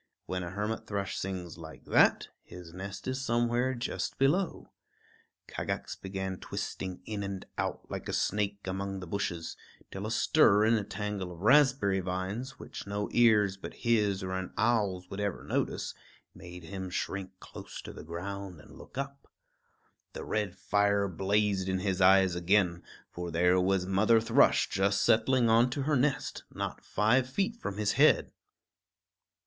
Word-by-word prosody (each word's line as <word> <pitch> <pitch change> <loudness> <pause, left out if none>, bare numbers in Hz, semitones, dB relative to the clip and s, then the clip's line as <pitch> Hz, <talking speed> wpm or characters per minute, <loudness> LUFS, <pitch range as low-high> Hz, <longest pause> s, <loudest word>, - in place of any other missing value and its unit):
When 90 0 -3
a 85 - -4
hermit 105 +4 -3
thrush 100 -2 -3
sings 90 -3 -5
like 80 -1 -11
that, - - +4
his 85 -2 -12
nest 100 +5 -7
is 130 +1 -2
somewhere 120 +2 +1
just 120 - -3
below. 160 +8 +1 0.8
Kagax - - -4
began 95 -1 -5
twisting 95 -1 -5
in 105 -2 -4
and 100 -1 -5
out - - -2
like - - -6
a - - -2
snake 100 0 -1
among 95 +1 -3
the 90 - -7
bushes, 85 -3 -3 0.4
till 95 +2 -5
a - - -3
stir 110 -6 +4
in 115 - +4
a 110 -3 +2
tangle 100 -2 -4
of 85 0 -11
raspberry 130 -5 +4
vines, 95 +8 -4
which - - -9
no 100 +1 -2
ears 105 -5 +4
but - - -8
his 105 -4 +1
or 95 - -4
an 95 0 -3
owl's 100 -5 +1
would 95 - -5
ever 100 -2 -2
notice, - - -2 0.4
made 90 0 -11
him 95 +2 -6
shrink 95 +1 -4
close - - -10
to - - -8
the - - -9
ground 90 +2 -6
and - - -15
look - - -13
up. 140 0 -6 0.8
The - - -6
red 105 -3 -2
fire 100 +1 +2
blazed 95 +1 0
in 95 - +1
his 95 0 -1
eyes 95 0 +6
again; 90 0 +2 0.3
for 90 0 -5
there 90 +2 +3
was 95 0 +1
Mother 105 +4 +4
Thrush 115 +1 +4
just 100 +1 +1
settling 120 +2 +3
onto 125 +5 +3
her 150 +2 +1
nest, 135 +1 0
not - - -5
five 120 +5 +2
feet 200 - -1
from 100 - -5
his 105 -1 +1
head. - - +4
100 Hz, 160 wpm, -30 LUFS, 95-110 Hz, 0.8 s, eyes